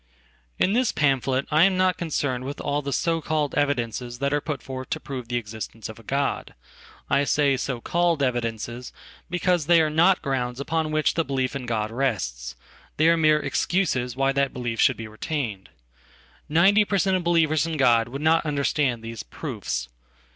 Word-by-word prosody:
In 195 - +2
this 250 +1 +2
pamphlet 135 -2 +1
I 155 +1 +4
am 195 -1 +2
not 185 -1 +3
concerned 140 -6 -2
with 140 +2 -6
all 145 +1 -1
the 140 0 -4
so 165 +3 0
calledevidences 140 -6 -1
that 140 +2 -1
are 145 - +1
put 145 -5 -4
forth 130 -1 -7
to - - -2
prove 130 -4 -7
the 120 - -3
existence 110 -1 -6
of 110 - -10
a - - -15
God. 140 +5 -2 0.5
I 140 - +2
say"so 135 -4 +1
called 170 -2 +1
evidences," 120 -1 -3 0.4
because 175 -2 0
they 170 -1 +6
are 155 -1 +2
not 170 +4 +4
grounds 125 -3 -2
upon 160 +2 -1
which 155 0 +2
thebelief 135 -5 -1
in 130 -3 -5
God 110 -2 -1
rests; 60 - -2 0.4
they 155 +2 +5
are 170 - +5
mere 155 -2 +4
excuses 130 -10 0
why 135 +1 +2
that 140 -1 0
belief 120 -2 -4
shouldbe 115 - +2
retained. 110 - -4 0.8
Ninety 190 +7 +5
per 200 -1 -1
cent. 190 0 +2
of 185 - -1
believers 165 -2 +2
in 160 -1 -3
God 120 -4 +4
would 140 +4 -6
notunderstand 145 -6 +1
these 115 -1 -6
"proofs." - - -5
140 Hz, 170 wpm, -24 LUFS, 120-160 Hz, 0.8 s, they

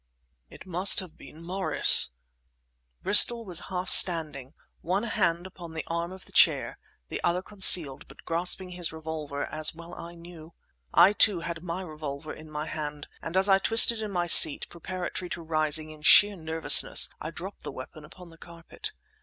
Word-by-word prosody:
"It - - -16
must 185 +2 +3
have 185 -5 -11
been 160 +2 -17
Morris!—" 185 - +2 0.9
Bristol 230 +2 +4
was 180 -4 -2
half 185 -1 -6
standing, 155 -8 +3 0.3
one 190 +5 -4
hand 175 -7 -3
upon 175 -3 -13
the 160 - -7
arm 170 +1 -6
of 190 0 -14
the - - -14
chair, - - +1 0.3
the - - -7
other 180 +2 -2
concealed, 175 -9 +3
but - - -19
grasping 180 +2 -1
his 175 -1 -7
revolver 155 -3 -8
as 155 0 -3
I - - -18
well 170 0 -12
knew. 170 -1 -16 0.4
I, 200 - +3
too, 205 -4 +3
had 170 0 -8
my 180 +2 -7
revolver 155 -2 -10
in 155 0 -15
my 150 0 -7
hand, 150 -2 -8
and 170 +3 -6
as 190 +1 +2
I 195 -1 +2
twisted 225 +2 +4
in 215 - -7
my 175 -3 -4
seat, 160 -3 +4
preparatory 180 +1 -8
to 170 - -8
rising, 155 -1 -3
in 155 -1 -16
sheer 205 +6 +5
nervousness 160 - +3
I - - -7
dropped - - -11
the - - -9
weapon 155 - -13
upon 170 +3 -16
the 165 - -21
carpet. 170 -1 -13
170 Hz, 175 wpm, -24 LUFS, 155-185 Hz, 0.9 s, sheer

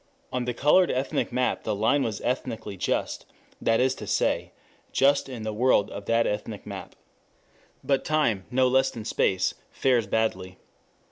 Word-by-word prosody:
On 125 -1 -1
the 125 - -1
colored 175 +8 +4
ethnic 130 0 -1
map 125 +1 0
the 110 - -2
line 110 +8 +2
was 110 -5 -2
ethnically 120 -5 -3
just, 95 - -2 0.3
that 115 0 +2
is 130 +1 +3
to - - -9
say, - - 0 0.4
just 140 0 +3
in 120 -4 -6
the 110 0 -3
world 115 -2 +3
of 100 - -7
that 115 0 +2
ethnic 105 0 -4
map. - - -8
4 - - -36 0.8
But 135 -1 +1
time, 120 -11 +1
no 130 0 +3
less 130 +1 +3
than 110 -2 -8
space, 95 -3 +1 0.2
fares 125 -5 +1
badly. 95 -4 -1
120 Hz, 165 wpm, -26 LUFS, 105-130 Hz, 0.8 s, colored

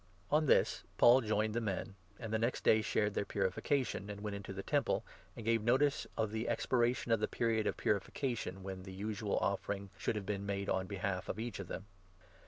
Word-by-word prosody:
On 155 +1 +4
this, - - +4 0.2
Paul 125 +2 +7
joined 110 -1 +1
the 120 - 0
men, 100 -2 -2 0.3
and 110 -2 -5
the 110 - +2
next 115 +3 0
day 110 - +5
shared 105 -1 +1
their - - 0
26 - - -13
purification, 105 +3 0
and 100 0 -6
went 105 -1 -3
into 100 -1 -6
the 95 0 -5
Temple, - - +1 0.3
and 115 - -8
gave 115 -1 +3
notice 135 +6 +2
of 110 -2 0
the 110 +1 -2
expiration 120 -1 +1
of 115 - +4
the - - +1
period 115 -2 +1
of - - -1
purification 105 -2 -1
when 95 -1 -5
the 95 0 -9
usual 105 +2 -2
offering 100 -1 -1
should - - 0
have 105 -2 -3
been 100 -1 -2
made 100 0 -2
on 95 0 0
behalf 95 -1 -3
of - - -2
each 115 -2 -4
of 100 - -5
them. 95 - -6
105 Hz, 210 wpm, -35 LUFS, 100-115 Hz, 0.3 s, Paul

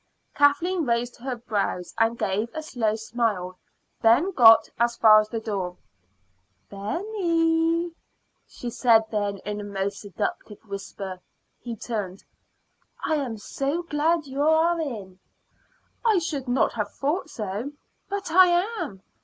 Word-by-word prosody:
Kathleen 325 +5 +3
raised 240 -1 -1
her 255 +1 -4
brows 210 -6 -3
and 225 +1 +2
gave 210 +4 -1
a 315 - -4
slow 225 -8 -1
smile. 220 -5 -2 0.4
Ben 240 +12 +4
got 225 - +7
as 235 0 +1
far 215 -1 +8
as 215 0 -2
the 225 - -3
door. 195 -5 -4 0.9
"Benny," 330 - 0 0.6
she 240 - -7
said 230 -2 +4
then 205 -2 -1
in 210 0 -3
a - - -6
most 200 0 -3
seductive 205 +1 -4
whisper. 195 -2 -7 0.4
He 235 -1 -6
turned. 205 -4 -5 0.8
"I - - +1
am 250 -6 -3
so 275 +10 -3
glad 320 0 +1
you 275 +1 -4
are 320 +2 +3
in." 205 -11 -6 0.8
"I 445 -4 +4
should 300 -6 -2
not 245 -1 +2
have 210 -3 -3
thought 310 +5 -2
so." 215 +2 -4 0.4
"But 395 -4 -4
I 370 +2 +7 0.3
am. 190 -1 -6
235 Hz, 135 wpm, -25 LUFS, 205-315 Hz, 0.9 s, far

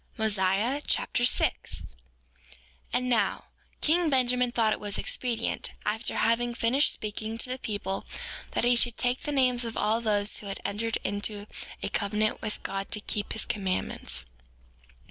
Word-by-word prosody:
Mosiah 215 +5 +2
Chapter 240 - +2
6 - - 0
6:1 - - -27 1.0
And 250 - 0
now, 240 -3 +1 0.4
king 330 +1 +3
Benjamin 250 -2 +3
thought 225 -3 +3
it - - -4
was 205 -1 0
expedient, 235 -2 -1
after 220 +3 -1
having 235 +1 +2
finished 255 +6 +4
speaking 215 +1 -4
to 240 - 0
the 255 - -3
people, 205 -4 -3 0.5
that - - +1
he 245 +1 +5
should 235 -1 +3
take 250 0 0
the 295 - -3
names 255 -3 +3
of 230 -2 -4
all 220 +2 +2
those 210 -2 +1
who 205 - -9
had 195 - -5
entered 225 +2 -1
into 205 +1 -2 0.4
a - - -1
covenant 210 +1 0
with 215 -1 -4
God 195 0 -3
to 210 - -1
keep 205 0 -2
his 220 - -1
commandments. 185 - 0
225 Hz, 160 wpm, -28 LUFS, 205-245 Hz, 1.0 s, he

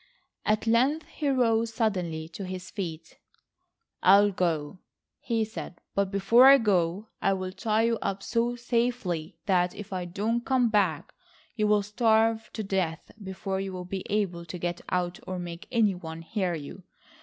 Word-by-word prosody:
At 215 +1 +2
length 260 +8 +2
he 300 - -3
rose 230 -4 +2
suddenly 180 -8 -1
to 185 +4 -7
his 185 -1 -6
feet. 170 -6 -6 0.8
"I'll 200 +2 +6
go," 170 -2 -1 0.4
he 225 -2 0
said, 210 -4 -8
"but 200 -1 +1
before 210 +6 +6
I 275 0 +10
go, 200 -2 0
I'll 185 -1 0
tie 215 +3 0
you 230 -1 +1
up 195 0 -2
so 235 +1 0
safely 230 -9 -1
that, 180 -3 +2
if 210 -1 -8
I 180 -1 -2
don't 215 +7 -1
come 255 -3 +2
back, 190 -8 +1 0.4
you'll 210 -2 +2
starve 225 +1 +2
to 220 - -3
death 185 -5 -2
before 190 0 -3
you'll 185 -2 -5
be 190 +1 -4
able 195 -5 -1
to 170 +2 -6
get 175 0 -3
out 180 -1 -1
or 185 - -3
make 175 -1 -7
any 225 -5 +3
one 165 -2 -8
hear 185 -1 -1
you. 150 +4 -8
195 Hz, 155 wpm, -27 LUFS, 180-225 Hz, 0.8 s, I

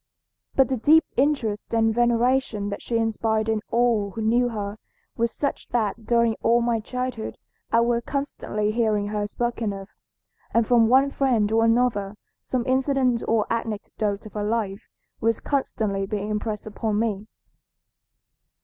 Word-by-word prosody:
But 265 0 +4
the 260 - 0
deep 310 +8 +5
interest 245 -7 0
and 225 -1 +3
veneration 240 -2 +1
that 200 - -5
she 235 - -1
inspired 220 -1 0
in 220 -1 0
all 230 -4 +2
who 220 +3 -6
knew 240 +3 +3
her 210 -2 -5 0.4
were 235 - +1
such 280 +4 -3
that 225 -1 -1
during 235 -1 +3
all 235 +1 +4
my 235 -1 +1
childhood 250 0 -4 0.3
I 230 - +4
was 235 0 +1
constantly 225 -7 -2
hearing 215 -3 +1
her 210 -1 -2
spoken 235 -1 -2
of, 195 0 -8 0.7
and 230 -1 +4
from 230 -1 +4
one 265 +3 +4
friend 235 -7 +1
or 225 +1 +3
another 225 -4 +1 0.3
some 250 -2 -2
incident 260 -2 +2
or 225 -2 +2
anecdote 215 -2 -3
of 215 - -10
her 210 - -2
life 210 -2 -2 0.3
was 230 0 +1
constantly 215 -8 -1
being 205 0 -3
impressed 210 0 -3
upon 215 0 -2
me. 215 -2 -1
225 Hz, 150 wpm, -24 LUFS, 210-240 Hz, 0.7 s, deep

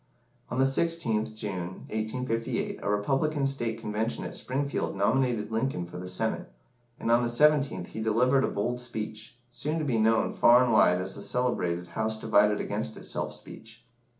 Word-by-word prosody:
On 125 - -3
the 130 - +4
16th 135 -7 0
June, 95 -4 -5
1858, 115 +2 -2
a - - -2
Republican 135 +8 +1
State 120 -5 -1
Convention 110 +1 -2
at - - -5
Springfield 140 -1 -2
nominated 115 +1 +1
Lincoln 110 -5 -1
for 85 - -9
the 90 0 -5
Senate, 90 - -1 0.5
and 115 - 0
on 120 +1 +5
the 120 - 0
17th 145 +3 +3
he - - -7
delivered 125 +5 +3
a - - +2
bold 120 +5 -2
speech, 110 -1 -6
soon 150 +6 -2
to 155 - -1
be 120 -5 +1
known 110 +1 +3
far 120 +2 +6
and 120 -2 +1
wide 90 -4 +5
as 95 +1 -4
the - - -9
celebrated 90 -9 -1
"House 110 +2 -2
divided 105 -1 +3
against - - -2
itself" - - -3
speech. 115 +1 -10
115 Hz, 170 wpm, -28 LUFS, 105-130 Hz, 0.5 s, far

